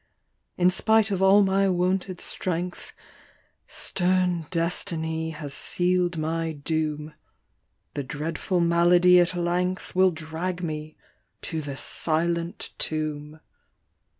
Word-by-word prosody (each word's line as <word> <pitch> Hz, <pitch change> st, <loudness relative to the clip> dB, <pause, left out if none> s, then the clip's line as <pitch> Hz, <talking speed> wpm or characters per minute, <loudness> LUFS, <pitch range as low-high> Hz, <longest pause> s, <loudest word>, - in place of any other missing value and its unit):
« -, -, -49 dB
In 180 Hz, 0 st, +4 dB
spite 220 Hz, +2 st, +3 dB
of 190 Hz, -1 st, -1 dB
all 195 Hz, +2 st, +6 dB
my 195 Hz, 0 st, +2 dB
wonted 185 Hz, +1 st, 0 dB
strength, 180 Hz, 0 st, -3 dB, 0.8 s
Stern 180 Hz, -3 st, 0 dB
destiny 165 Hz, -2 st, -2 dB
has 150 Hz, -3 st, -5 dB
seal'd 180 Hz, +1 st, 0 dB
my 160 Hz, +1 st, -2 dB
doom; 155 Hz, 0 st, -3 dB, 0.8 s
The 145 Hz, -, -3 dB
dreadful 160 Hz, +6 st, -2 dB
malady 175 Hz, +1 st, +5 dB
at 175 Hz, +1 st, +2 dB
length 180 Hz, +2 st, -1 dB
Will 185 Hz, +1 st, +5 dB
drag 165 Hz, +2 st, -4 dB
me 155 Hz, -1 st, -5 dB, 0.5 s
to 160 Hz, -2 st, -3 dB
the 140 Hz, -2 st, -6 dB
silent 170 Hz, +3 st, -1 dB
tomb 155 Hz, 0 st, -2 dB
170 Hz, 110 wpm, -25 LUFS, 160-180 Hz, 0.8 s, all